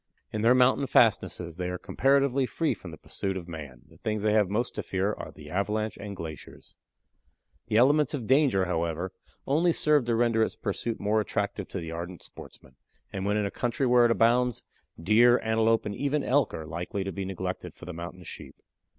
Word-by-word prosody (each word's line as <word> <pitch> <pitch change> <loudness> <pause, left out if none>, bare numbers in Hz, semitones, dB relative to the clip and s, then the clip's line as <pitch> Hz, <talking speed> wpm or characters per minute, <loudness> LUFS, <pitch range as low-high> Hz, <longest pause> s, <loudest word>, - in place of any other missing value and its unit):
In 105 - -2
their 120 +3 +5
mountain 130 +2 +3
fastnesses 85 -7 +2
they 90 -1 -2
are 90 - -3
comparatively 135 +3 +2
free 165 +3 0
from 90 - -10
the 80 - -10
pursuit 95 +4 -4
of 90 -2 -7
man; 70 -7 -9
the 80 +1 -20
things 110 -2 -2
they 105 -1 +2
have 105 -3 +3
most 115 +5 -1
to - - -3
fear 95 +2 -1
are - - -8
the - - -12
avalanche 105 +3 -1
and 100 -1 -7
glaciers. 80 -4 -9 0.9
The 110 - +1
elements 145 +4 +4
of 125 -6 -5
danger, 130 -7 +3
however, 85 +1 -2 0.3
only 165 +5 +3
serve 150 -5 +3
to 120 -1 +1
render 115 -1 +2
its 110 - 0
pursuit 110 +3 -3
more 105 +2 +1
attractive - - -3
to - - -5
the 80 -1 -6
ardent 85 +2 -6
sportsman, 65 0 -13 0.4
and 95 0 -3
when 105 +1 +1
in 105 - 0
a 100 - -3
country 120 +2 -1
where 125 -1 +5
it - - +4
abounds, 120 +1 +2 0.4
deer, 115 +7 +5
antelope, 110 0 +2
and 105 - -3
even 140 +5 -1
elk 140 +2 +2
are 80 - -6
likely 85 +5 -4
to 95 - -4
be 100 - -4
neglected 95 -1 -5
for - - -12
the 90 - -6
Mountain 85 +2 -8
Sheep. 80 - -9
105 Hz, 200 wpm, -27 LUFS, 90-120 Hz, 0.9 s, their